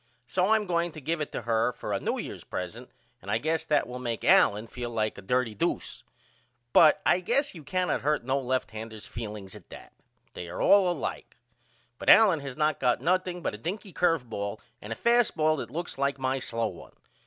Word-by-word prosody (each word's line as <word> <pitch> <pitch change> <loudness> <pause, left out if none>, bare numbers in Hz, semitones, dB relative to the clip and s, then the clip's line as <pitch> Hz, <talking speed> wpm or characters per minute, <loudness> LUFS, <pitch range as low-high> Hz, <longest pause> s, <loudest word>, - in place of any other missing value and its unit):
So 180 +9 +1
I 220 - +5
am 215 -1 0
going 170 -2 0
to 155 - -8
give 155 +3 -2
it 150 - -3
to - - -4
her 115 +1 +1
for - - -5
a - - 0
New - - -2
Year's - - -6
present 110 +8 -6 0.3
and - - -10
I - - +2
guess 160 +2 -1
that 150 - +2
will 125 +1 -7
make 120 -2 -3
Allen 105 +2 +4
feel 120 +1 -6
like 110 -2 -1
a - - -10
dirty 120 +3 0
doose. 100 - -2 0.7
But 155 -2 +6
I 180 - +4
guess 265 +10 0
you 165 -4 -11
cannot 180 +5 -1
hurt 150 -1 0
no 135 +3 0
lefthander's 110 -4 -4
feelings 105 -4 -7
at - - -14
that. - - -12 0.4
They 85 - -7
are 90 - -6
all 195 -3 +5
alike. - - -5 0.6
But - - -1
Allen 200 -8 +7
has 140 -2 -7
not 155 0 +1
got 125 -1 +2
nothing 180 0 0
but - - -1
a 105 - -8
dinky 190 - -5
curve 165 -8 +1
ball 100 -1 -4 0.2
and 105 - -9
a - - -2
fast 235 - +2
ball 155 0 +3
that - - -5
looks 170 -3 -5
like 140 0 0
my 135 0 -1
slow 115 -3 -2
one. 85 - -12
135 Hz, 215 wpm, -28 LUFS, 115-175 Hz, 0.7 s, Allen